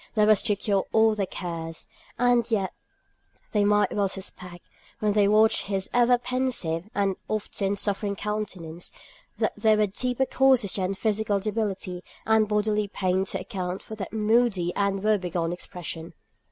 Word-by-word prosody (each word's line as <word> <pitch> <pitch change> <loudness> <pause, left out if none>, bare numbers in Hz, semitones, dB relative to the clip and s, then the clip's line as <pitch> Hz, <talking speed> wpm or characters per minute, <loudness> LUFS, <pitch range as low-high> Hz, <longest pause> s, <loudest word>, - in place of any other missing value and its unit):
That 210 -1 +4
was 215 -2 +6
to 210 -3 +1
cure 200 -1 0
all 220 0 +4
their 200 -3 -1
cares; 165 -3 -5 0.3
and 245 -1 +3
yet 200 -5 0 0.8
they 210 -1 +2
might 205 -1 +3
well 200 -2 +1
suspect, 180 -2 -7 0.3
when 210 -1 +1
they 205 -1 +4
watched 215 +2 +4
his 195 -1 -1
ever 245 0 +5
pensive, 240 -9 -1
and 195 -2 +1
often 205 -2 -1
suffering 200 0 -1
countenance, 195 -6 -4 0.5
that - - 0
there 220 -1 +3
were 210 - +4
deeper 250 +6 -1
causes 260 -7 +3
than 190 0 -1
physical 210 0 0
debility 195 -4 -3 0.2
and 220 -1 +4
bodily 210 0 +1
pain 190 -1 0
to - - -3
account 185 -3 -4
for - - -9
that 205 -3 -6
moody 215 -4 +2
and 200 -1 0
woe 215 -1 +3
begone 175 -2 -2
expression. 170 -2 -7
205 Hz, 155 wpm, -26 LUFS, 190-220 Hz, 0.8 s, was